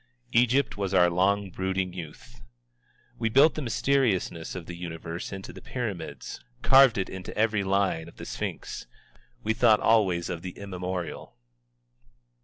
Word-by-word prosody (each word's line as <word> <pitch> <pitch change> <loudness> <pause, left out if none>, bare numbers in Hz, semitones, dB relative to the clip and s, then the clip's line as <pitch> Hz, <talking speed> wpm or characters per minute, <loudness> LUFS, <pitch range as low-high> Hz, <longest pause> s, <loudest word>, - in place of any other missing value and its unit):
Egypt 125 +2 +3
was 100 -1 -1
our 90 -1 +5
long 95 +2 +1
brooding 95 0 -2
youth. 75 -8 -10 0.8
We 115 -1 +1
built 140 +7 +6
the 155 - -4
mysteriousness 115 - 0
of 90 -3 -6
the 85 - -7
Universe 85 -1 -6
into 95 -1 -7
the - - -11
Pyramids, 105 - -5 0.2
carved 135 -4 +7
it 95 - 0
into 95 -1 -8
every 105 -2 +2
line 95 -4 +1
of 85 - -14
the - - -8
Sphinx. - - -5 0.6
We 110 - +1
thought 110 -2 +5
always 95 -7 +3
of 85 - -4
the 90 0 -7
immemorial. 90 -7 -5
95 Hz, 145 wpm, -27 LUFS, 90-110 Hz, 0.8 s, carved